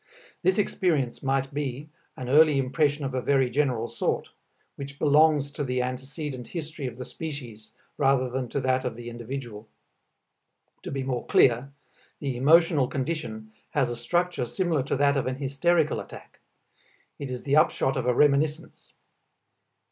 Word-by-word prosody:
This 185 +1 +2
experience 165 - 0
might 135 0 -1
be 145 0 -3 0.3
an 125 - -6
early 150 +2 +5
impression 145 +2 +1
of 135 - -3
a 130 - -1
very 135 -2 +2
general 125 -4 0
sort, 115 - -2 0.5
which 140 0 -8
belongs 150 -1 +4
to 145 - -4
the 125 -1 0
antecedent 130 +1 -5
history 160 -4 -5
of 125 - -7
the 125 - -6
species 125 -10 -8 0.3
rather 135 -2 +3
than 125 0 -3
to 140 - -1
that 130 0 +1
of 125 -3 -3
the 120 0 -8
individual. 120 -2 -7 1.1
To - - -7
be 135 -1 -3
more 130 -2 -3
clear: 125 +2 +4 0.5
the 135 -3 -3
emotional 150 +1 +4
condition 130 -7 -4 0.2
has 130 -5 +2
a - - -3
structure 170 +2 -1
similar 170 -1 0
to - - -1
that 140 +1 +3
of 130 - -1
an 130 - -1
hysterical 150 +4 +1
attack; - - -11 0.8
it 140 - -5
is 125 -1 -5
the 140 0 +1
upshot 135 -3 +3
of 125 -2 -2
a 125 - +3
reminiscence. 150 +3 +1
135 Hz, 155 wpm, -26 LUFS, 125-150 Hz, 1.1 s, early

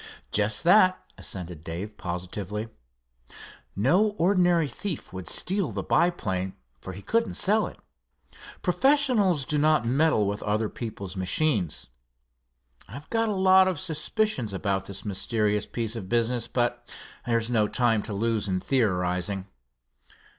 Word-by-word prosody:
"Just 105 0 +1
that," 185 +1 +6 0.2
assented 90 -4 -7
Dave, 90 +6 -6
positively. 95 +5 -5 1.1
"No 185 - +2
ordinary 175 -3 +3
thief 170 - -5
would 95 -3 -6
steal 190 - 0
the 95 -2 -4
biplane, 95 - 0 0.3
for 95 - -7
he 100 +2 -10
couldn't 230 0 0
sell 210 +2 +2
it. - - -11 0.9
Professionals 210 - +3
do 150 +2 0
not 155 -4 +3
meddle 135 -2 +2
with 100 +1 -2
other 105 +1 0
people's 100 -5 -6
machines. 95 - 0 1.0
I've 140 - -11
got 225 -1 +1
a 210 - -1
lot 190 0 +6
of 185 -5 -1
suspicions 160 - -1
about 95 0 -1
this 100 - -6
mysterious 105 +1 0
piece 115 -1 -3
of 95 -5 -6
business, 120 0 +1
but 120 -1 -2 0.4
there's 115 0 0
no 110 -3 +3
time 115 -1 +2
to 105 - -6
lose 110 0 0
in 95 -1 0
theorizing." 95 -5 0
115 Hz, 130 wpm, -26 LUFS, -, 1.1 s, that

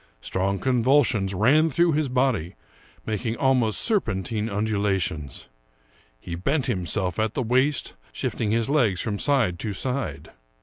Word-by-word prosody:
Strong 95 +8 -1
convulsions 125 -3 +2
ran 145 - +4
through 170 +4 +2
his 150 -2 0
body, 125 -9 0 0.5
making 110 +1 -2
almost 130 -5 +2
serpentine 110 - 0
undulations. 100 - -2 0.7
He 85 - -8
bent 135 - -1
him 95 -8 -2
self 95 -1 0
at 110 0 -1
the 130 - 0
waist, 130 +5 +1 0.2
shifting 110 - -2
his 115 +1 +1
legs 120 -11 +2
from 105 -3 -2
side 120 -12 +1
to 105 -3 -3
side. 130 +7 -4
110 Hz, 135 wpm, -24 LUFS, 95-130 Hz, 0.7 s, ran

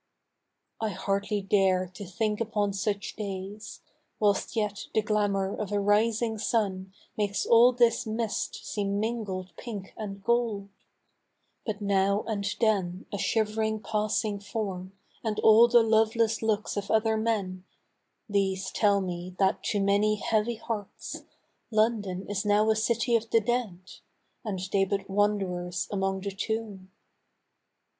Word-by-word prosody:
I 220 - 0
hardly 200 +1 -1
dare 190 -2 +3
to 200 - -8
think 210 +3 -1
upon 210 -3 0
such 200 +1 -2
days, 200 +1 -6 0.4
Whilst 205 +2 +1
yet 210 -2 -2
the 220 - +3
glamour 205 -2 0
of 210 -2 -4
a 205 - +1
rising 220 +2 +2
sun 195 -4 -1 0.2
Makes 205 -2 -1
all 235 +2 +7
this 235 -2 +2
mist 220 0 -3
seem 200 -1 -1
mingled 205 -5 -3
pink 205 -5 -7
and 200 -2 -7
gold; 230 -4 0 1.0
But 215 -1 -3
now 200 0 +2
and 205 -3 -2
then 195 -5 +1
a 205 - -2
shiv'ring 220 0 0
passing 215 -1 -1
form, 195 -3 -4 0.3
And 215 -2 -1
all 225 +2 +8
the 240 -1 +6
loveless 225 0 +2
looks 215 -1 0
of 200 0 -3
other 220 0 +3
men, 205 -5 -1 0.6
These 195 -2 0
tell 200 -2 +3
me 180 0 -5
that 195 +1 +2
to 205 - 0
many 200 +2 +3
heavy 220 +2 0
hearts 220 -3 -5 0.5
London 215 -4 +1
is 200 0 -2
now 210 +1 +3
a - - +2
city 235 +2 +1
of 230 0 0
the 230 - +5
dead. 225 -5 -1 0.6
And 205 -5 -3
they 195 -1 +4
but 195 0 -2
wanderers 190 -3 0
amongst 195 -1 -1
the 195 - -4
tomb. 210 -3 -4
205 Hz, 135 wpm, -28 LUFS, 195-220 Hz, 1.0 s, all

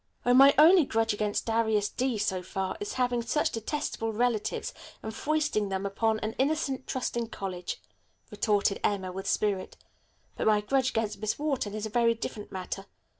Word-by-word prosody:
"Oh, 245 - +4
my 275 +2 +9
only 335 +4 +8
grudge 225 -3 +1
against 210 0 -1
Darius 220 -2 +1
D. 250 0 -1
so 190 -3 -1
far 190 +1 -3
is 415 - -4
his - - -4
having 245 -2 +1
such 245 +6 0
detestable 225 -1 -3
relatives 230 -1 -1 0.3
and 220 - -5
foisting 295 -6 0
them 190 0 -2
upon 220 +2 0
an 215 +1 -2
innocent, 275 -2 0
trusting 240 -2 -2
college," 185 -5 -5 0.5
retorted 205 -2 +1
Emma 190 -3 0
with 190 +1 -6
spirit, 200 -3 0 0.6
"but - - -1
my 210 -1 +4
grudge 260 +4 +1
against 215 -4 -2
Miss 215 0 -1
Wharton 275 -9 -2
is 215 0 -3
a 220 - -6
very 230 0 +3
different 215 -2 -6
matter. 190 +1 -5
220 Hz, 175 wpm, -28 LUFS, 205-255 Hz, 0.6 s, my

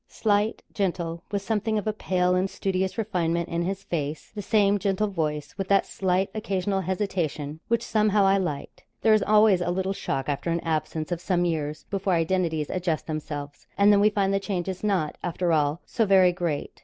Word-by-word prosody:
Slight, 210 0 0
gentle, 170 -4 -2
with 200 -1 -1
something 215 +1 0
of 210 - -2
a 215 - 0
pale 180 -3 +1
and 185 +1 +1
studious 190 +1 -2
refinement 170 -6 -1
in 170 0 -1
his 190 +2 -3
face. 150 -4 -4
The 210 - -5
same 205 0 +3
gentle 200 +2 0
voice, 150 -5 -3
with 195 - -2
that 195 0 +3
slight, 190 +1 0
occasional 195 -2 -1
hesitation, 170 -6 -2
which 235 0 0
somehow 210 -3 +3
I 195 0 +4
liked. 150 -7 -4 0.2
There 220 - +5
is 215 - +4
always 210 -2 +4
a 175 - -1
little 190 +2 -1
shock 135 -7 -3
after 145 +3 -2
an 170 0 +1
absence 160 0 -2
of 175 -1 -2
some 175 0 +1
years 155 -3 -2
before 195 -1 0
identities 165 -2 0
adjust 175 -4 -1
themselves, 145 -2 -6
and 205 +1 +6
then 200 - +5
we 210 +1 +5
find 195 -2 +1
the 195 - +2
change 195 -3 -3
is 190 +1 -5
not, 185 -8 0
after 175 0 0
all, 150 +1 +1
so 225 -3 0
very 190 -2 +6
great. 170 -5 -3
185 Hz, 195 wpm, -26 LUFS, 165-200 Hz, 0.2 s, and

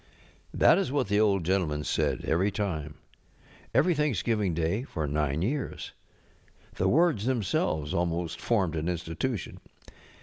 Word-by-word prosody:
ŌĆØ - - -5
That - - +7
is 195 - -1
what 135 -7 0
the 105 +1 +3
Old 100 -4 +3
Gentleman 80 -4 0
said - - -1
every 95 +5 +2
time. 80 -8 -3 0.8
Every 180 +2 +3
Thanksgiving 115 - 0
Day 85 +7 0
for 80 - -4
nine 75 +2 0
years. 135 +6 -3 0.8
TJic - - -1
words 155 - +3
themselves 90 - 0
almost 85 -1 -2
formed 95 -8 +1
an 80 +2 -1
Institution. 90 +6 -3
95 Hz, 135 wpm, -28 LUFS, 80-115 Hz, 0.8 s, That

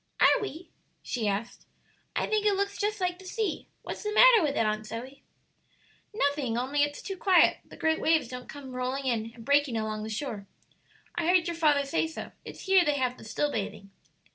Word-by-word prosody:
"Are - - +5
we?" 350 -3 -7 0.3
she 230 -4 -2
asked, 205 +3 -3 0.5
"I - - +1
think 430 -1 +1
it 415 -1 +3
looks 400 +1 -1
just 420 0 -1
like 360 -1 -1
the 380 - -13
sea; 410 -2 -3 0.2
what's - - -6
the 420 - -3
matter 475 0 +7
with 295 -3 0
it, 225 - +2
Aunt 215 0 -1
Zoe?" 255 +6 -7 0.9
"Nothing, 285 - 0
only 270 +4 0
it's 290 0 -1
too 390 - -4
quiet; 375 -1 +4
the - - -15
great 320 0 +1
waves 320 -5 +3
don't 250 +1 -8
come 270 -3 -9
rolling 255 +2 -2
in 230 -3 -1
and 230 -2 -12
breaking 285 -3 +3
along 215 -1 -2
the 215 - -5
shore. 215 -3 -4 0.7
I 335 -2 -1
heard 360 -1 +4
your 340 - -2
father 295 -4 +3
say 320 +3 0
so; 320 - -7
it's - - -10
here 385 -2 +5
they 295 -3 +1
have 255 -2 -1
the - - -12
still 290 +6 -1
bathing." 195 -2 -5
285 Hz, 205 wpm, -28 LUFS, 240-360 Hz, 0.9 s, matter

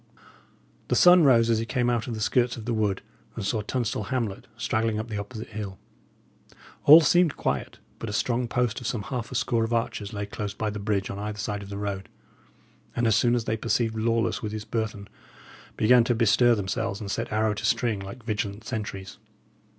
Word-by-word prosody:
The - - +1
sun 180 -2 +7
rose 115 -4 +5
as 110 - +2
he 115 - -2
came 120 -1 0
out 120 -1 0
of 120 - -3
the 110 - -5
skirts 120 +2 +1
of 110 - -8
the 120 - -1
wood 105 -3 0 0.3
and - - -4
saw 110 +2 0
Tunstall 110 -1 -2
hamlet 115 -5 -3
straggling 110 -1 0
up 110 +2 -4
the 105 -2 -3
opposite 110 +2 -7
hill. 105 -3 -6 1.1
All 155 +3 +10
seemed 175 0 +3
quiet, - - -2 0.2
but 115 - -5
a - - -4
strong 120 +2 0
post 125 0 -1
of 120 - -4
some 110 -4 -2
half 120 0 -5
a - - -6
score 115 -3 +1
of 115 +1 -2
archers 110 -3 -2
lay 100 -1 -4
close 105 0 -5
by 110 0 -2
the 105 - -5
bridge 100 -1 -1
on 100 - -6
either 105 0 -4
side 105 0 -3
of 100 - -9
the 100 - -5
road, 100 -1 -4 0.9
and, 120 - +1
as 110 -2 +4
soon 120 +2 +3
as 120 -2 -1
they 110 - 0
perceived 115 0 0
Lawless 115 +1 0
with 105 -1 -4
his 110 0 -5
burthen, 110 -3 -3 0.7
began 120 +2 +5
to 120 - +1
bestir 120 +1 +4
themselves 105 +1 -2
and 100 -2 -5
set - - -3
arrow 110 0 +1
to 105 - -6
string 120 -3 +1
like 100 +5 -9
vigilant 105 -2 -3
sentries. 105 -5 -6
110 Hz, 210 wpm, -26 LUFS, 105-120 Hz, 1.1 s, All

